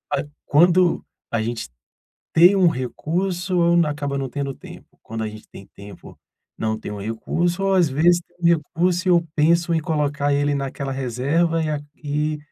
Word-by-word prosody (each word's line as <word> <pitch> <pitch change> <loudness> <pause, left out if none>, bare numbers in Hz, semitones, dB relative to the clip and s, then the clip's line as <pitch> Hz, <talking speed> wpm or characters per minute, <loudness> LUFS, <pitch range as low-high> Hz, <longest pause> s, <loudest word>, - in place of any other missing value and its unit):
Que - - -2 0.2
quando 175 +3 +4 0.3
a 115 - 0
gente 115 +1 -3 0.7
tem 175 +4 +7
um 190 -3 +5
recurso 175 - -2 0.3
acaba 145 -2 -3
não 135 -1 -3
tendo 140 +1 -3
tempo, - - -13 0.2
quando 110 0 -5
a - - -3
gente 105 0 -12
tem 100 - -12
tempo 100 0 -12 0.4
não 110 0 -1
tem - - -7
o 105 - -6
recurso 170 - -2
ou 195 0 +2
às 180 -4 +4
vezes 170 +6 +3
tem 175 -1 +1
recurso 175 +4 -1
e - - +5
eu 170 -1 +3
penso 170 +3 +2
em 160 - +1
colocar 145 -3 0
ele 145 0 +1
naquela 140 0 -4
reserva, 140 +6 0
e 155 - -1
aqui 150 +1 -3
150 Hz, 170 wpm, -22 LUFS, 135-170 Hz, 0.7 s, tem